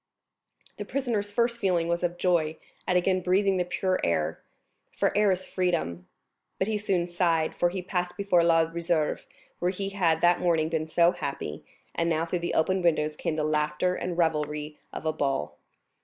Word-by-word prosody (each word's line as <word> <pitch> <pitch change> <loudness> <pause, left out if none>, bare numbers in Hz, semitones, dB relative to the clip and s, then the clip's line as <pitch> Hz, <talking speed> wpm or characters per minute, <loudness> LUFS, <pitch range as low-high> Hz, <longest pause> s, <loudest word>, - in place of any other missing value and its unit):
The - - -4
prisoner's 230 -7 -2
first 235 +2 +1
feeling 180 -5 +1
was 170 0 0
of 175 0 -1
joy 165 -4 +1 0.3
at 180 - +3
again 185 +1 +2
breathing 190 +2 +2
the 180 - +2
pure 185 +1 -1
air—for 80 - -3
air 210 0 +4
is 185 0 -1
freedom; 160 - -1 0.5
but 190 - 0
he 215 -1 0
soon 190 -4 0
sighed, 170 -2 +1
for 175 - +1
he 180 +1 -5
passed 180 -1 -2
before 195 -4 +3
La 165 -1 +4
Réserve, 165 -1 -1 0.3
where 175 - +1
he 195 +1 -3
had 170 -5 +1
that 175 0 +4
morning 165 -3 +2
been 160 -1 -1
so 170 +2 +4
happy, 140 - -5 0.3
and 170 0 0
now 160 0 +1
through 175 +1 -2
the 170 - -3
open 185 +4 +2
windows 155 -3 +1
came 155 - -2
the 155 - -1
laughter 150 +3 +1
and 180 -1 -4
revelry 150 -2 -1
of - - -7
a 155 - +1
ball. 105 - -2
175 Hz, 180 wpm, -27 LUFS, 155-185 Hz, 0.5 s, air